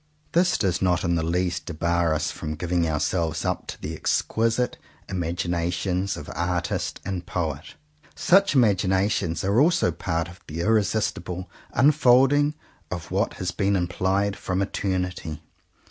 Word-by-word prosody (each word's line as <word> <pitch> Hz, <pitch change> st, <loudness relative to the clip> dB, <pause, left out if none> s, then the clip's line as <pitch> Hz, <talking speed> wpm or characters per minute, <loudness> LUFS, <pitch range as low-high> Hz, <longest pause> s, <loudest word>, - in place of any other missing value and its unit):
This 175 Hz, +2 st, +3 dB
does 90 Hz, -4 st, 0 dB
not 90 Hz, -2 st, +2 dB
in 85 Hz, -, +1 dB
the 85 Hz, -, +1 dB
least 85 Hz, +1 st, -1 dB
debar 85 Hz, 0 st, +1 dB
us 75 Hz, -, -1 dB
from 75 Hz, 0 st, -5 dB
giving 85 Hz, +1 st, 0 dB
ourselves 80 Hz, +1 st, -1 dB
up -, -, -2 dB
to -, -, -7 dB
the 80 Hz, -, -5 dB
exquisite 115 Hz, +8 st, 0 dB, 0.3 s
imaginations 90 Hz, +2 st, -1 dB
of -, -, -8 dB
artist 85 Hz, 0 st, -2 dB
and 95 Hz, -2 st, -3 dB
poet. 80 Hz, -4 st, -3 dB, 0.4 s
Such 195 Hz, -3 st, +4 dB
imaginations 95 Hz, -, +2 dB
are 100 Hz, +4 st, +2 dB
also 160 Hz, -, +3 dB
part 85 Hz, +1 st, -2 dB
of 90 Hz, +2 st, -13 dB
the 80 Hz, +3 st, -4 dB
irresistible 100 Hz, -3 st, 0 dB, 0.2 s
unfolding 145 Hz, +2 st, +4 dB, 0.3 s
of 85 Hz, -2 st, -6 dB
what -, -, 0 dB
has 90 Hz, -1 st, -3 dB
been 100 Hz, +1 st, +1 dB
implied 95 Hz, +2 st, 0 dB
from 95 Hz, +1 st, -1 dB
eternity. 90 Hz, -5 st, -3 dB
90 Hz, 135 wpm, -25 LUFS, 85-100 Hz, 0.4 s, Such